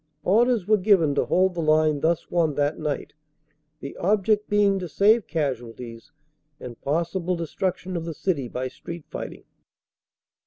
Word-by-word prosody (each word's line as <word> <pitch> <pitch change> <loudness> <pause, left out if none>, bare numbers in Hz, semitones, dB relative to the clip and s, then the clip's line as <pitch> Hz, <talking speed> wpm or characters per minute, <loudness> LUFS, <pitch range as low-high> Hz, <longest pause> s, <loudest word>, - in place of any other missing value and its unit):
Orders 230 +1 +3
were 215 +2 +4
given 180 -7 +4
to - - +1
hold 185 0 +2
the 170 - -3
line 155 -1 +3
thus 165 +2 0
won 165 -4 +1
that 145 +1 0
night, 150 -2 -3 0.7
the 140 - -7
object 210 +2 +1
being 205 -1 +3
to 180 - -5
save 210 +7 +3
casualties 120 -6 -4 0.5
and 120 -2 -9
possible 170 +4 -1
destruction 180 +2 -3
of 165 -1 -3
the 165 -2 -5
city 145 -9 -1
by 125 +2 -4
street 165 +5 -9
fighting. - - -7
170 Hz, 150 wpm, -24 LUFS, 145-195 Hz, 0.7 s, were